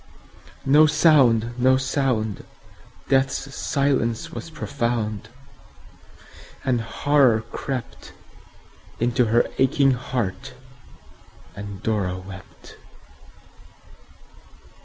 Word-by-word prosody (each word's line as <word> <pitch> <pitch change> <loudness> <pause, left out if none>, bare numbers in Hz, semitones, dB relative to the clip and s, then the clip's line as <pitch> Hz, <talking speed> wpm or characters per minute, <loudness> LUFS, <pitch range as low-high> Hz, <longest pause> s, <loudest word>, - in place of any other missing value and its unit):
No 150 +3 +6
sound! 135 -7 +4
no 130 +1 +4
sound! 130 -6 -1 0.6
Death's 135 0 0
silence 140 0 -1
was 165 - -7
profound; 115 -8 -3 1.4
10 - - -18
And 125 -3 +1
horror 120 0 +2
crept 130 -4 -6 0.9
Into 120 +1 +2
her 115 +2 +3
aching 135 +1 +3
heart, 125 0 -4 1.0
and 100 -1 -8
Dora 100 -5 -1
wept. 95 0 -12
125 Hz, 75 wpm, -23 LUFS, 110-135 Hz, 1.4 s, No